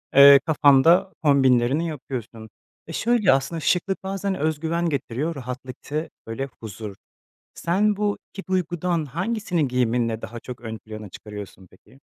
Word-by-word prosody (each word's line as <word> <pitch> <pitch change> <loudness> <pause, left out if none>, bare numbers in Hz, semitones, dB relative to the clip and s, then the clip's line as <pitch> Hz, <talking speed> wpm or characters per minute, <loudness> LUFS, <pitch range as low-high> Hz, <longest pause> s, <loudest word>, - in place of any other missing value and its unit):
eee, 140 0 +10
kafanda 155 +4 +5
kombinlerini 135 +1 +3
yapıyorsun 120 -6 -7 0.4
ve - - -6
şöyle 230 - +3
aslında 135 +5 0
şıklık 185 +4 0
bazen 195 0 -2
öz 155 -2 -1
güven 170 +2 0
getiriyor, 145 +3 -2
rahatlık 130 -1 -7
te 155 +3 -4 0.2
böyle, 135 +5 -4
huzur. 105 -2 -7 0.6
Sen 205 +5 +1
bu 205 0 0 0.2
2 195 - -7
duygudan 175 -2 0
hangisini 175 - -1
giyiminle 120 -2 0
daha 120 +1 -7
çok 125 0 -9
ön 110 -2 -6
plana 110 -1 -9
çıkarıyorsun 100 -1 -10
peki? 130 +8 -22
140 Hz, 140 wpm, -24 LUFS, 120-175 Hz, 0.6 s, eee